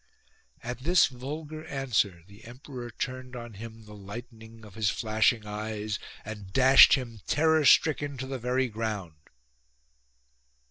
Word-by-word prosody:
At 120 +1 -5
this 170 +7 +4
vulgar 150 +4 -6
answer 115 - -1
the 100 +3 -17
emperor 125 0 -9
turned 130 +1 -5
on 120 -2 -8
him 110 +1 -10
the 105 - -12
lightning 110 +2 -10
of 105 - -14
his 105 -1 0
flashing 110 +1 +1
eyes 105 0 -4 0.3
and 105 -3 -8
dashed 130 +4 +8
him 120 -5 -6
terror 160 0 +3
stricken 145 -1 +4
to 130 - -4
the 135 0 -5
very 125 +2 0
ground. 105 -8 -4
120 Hz, 135 wpm, -28 LUFS, 105-130 Hz, 0.3 s, dashed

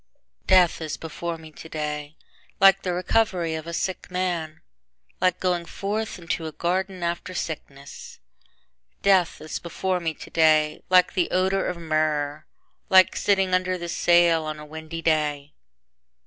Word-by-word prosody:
Death 180 -3 +4
is 155 -2 -4
before 165 +1 -5
me 160 -1 -13
today 150 -1 -5 0.4
Like 195 0 +6
the 180 - -2
recovery 180 -2 0
of 160 0 -5
a - - -4
sick 185 +2 -3
man, 175 -4 -3 0.6
Like 185 -1 +2
going 180 -2 0
forth 205 +5 -4
into 165 -2 -3
a - - -5
garden 185 +3 -2
after 175 +2 -3
sickness. 140 -4 -7 0.9
Death 190 -3 +3
is 155 - -5
before 180 +2 -2
me 165 -2 -3
today 155 -2 +2
Like 185 -1 +5
the 180 - +1
odor 190 +1 +1
of 180 - -3
myrrh, 155 -2 -1 0.4
Like 185 -1 +6
sitting 195 -2 +1
under 185 0 +1
the 170 -1 -6
sail 170 -1 +4
on 155 0 -4
a 150 - -9
windy 160 +2 -8
day. 150 -2 0
170 Hz, 145 wpm, -24 LUFS, 155-185 Hz, 0.9 s, Like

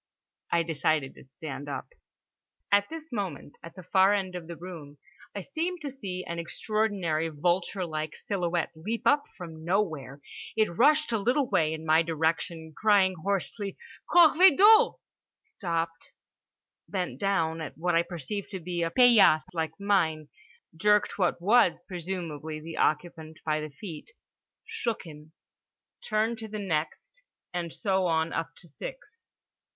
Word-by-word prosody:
I 170 0 +3
decided 155 -3 0
to - - -15
stand 140 +1 -8
up. 140 - -5 0.8
At 200 0 +4
this 320 -1 -8
moment, 190 - -4
at 165 - -11
the 185 - -10
far 190 +3 +4
end 190 -2 -2
of 175 -2 -7
the 170 - -7
room, 165 -5 -10 0.4
I 200 - -3
seemed 330 - -3
to 285 -2 -4
see 190 -8 -6
an 170 0 -4
extraordinary 180 -4 -1
vulture 175 +4 0
like 155 -1 -4
silhouette 175 -4 -2
leap 215 +9 -4
up 290 0 +4
from 160 -3 -9
nowhere. 160 -7 -1 0.4
It 215 -6 +2
rushed 300 - +4
a 225 - +1
little 250 +6 +1
way 160 -7 +2
in 160 0 -5
my 160 +1 +5
direction 160 0 -2
crying 200 -3 +4
hoarsely 200 +2 -2 0.3
"Corvée 345 -1 +7
d'eau!"—stopped, 200 - +2 0.8
bent 185 -1 -3
down 165 -5 0
at 155 - -7
what 175 +2 0
I 165 - +5
perceived 175 +4 -5
to 190 - -5
be 175 0 -3
a 165 - +1
paillasse 220 -8 +6
like 160 +2 -3
mine, 160 -7 +1 0.5
jerked 210 +4 +2
what 180 -2 +1
was 200 0 +4
presumably 165 -4 -5
the 160 +1 -8
occupant 160 0 -1
by 155 -1 +1
the 155 - -5
feet, 155 - -10 0.5
shook 440 - -3
him, 155 -2 -13 0.7
turned 220 +1 0
to 220 - -6
the 215 0 -6
next, 190 - -3 0.3
and 175 -2 -3
so 190 -1 0
on 160 0 0
up 165 0 -3
to 175 - -15
six. 455 - -10
175 Hz, 145 wpm, -28 LUFS, 160-210 Hz, 0.8 s, Corvée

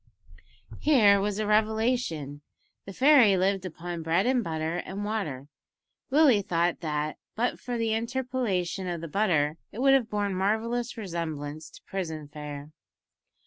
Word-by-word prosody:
Here 210 -10 +5
was 205 0 -1
a 215 - -1
revelation! 215 - 0 0.5
The 195 - -7
fairy 255 -6 +6
lived 190 +1 +1
upon 175 0 -6
bread 165 +4 +1
and 250 -1 +2
butter 160 -1 -2
and 195 +3 -5
water! 155 -12 -3 0.6
Willie 275 -6 +5
thought 175 -2 0
that, 150 -2 -3 0.2
but 245 +3 -1
for 245 -1 -4
the 225 -1 0
interpolation 230 -6 -2
of 175 -2 -3
the 165 - -5
butter, 160 -5 +1
it - - -11
would 270 +1 +5
have 255 -4 +3
borne 205 -1 -1
marvellous 225 +6 -1
resemblance 160 -6 -5
to - - -16
prison 160 -6 -5
fare. 150 0 -8
195 Hz, 145 wpm, -27 LUFS, 160-225 Hz, 0.6 s, fairy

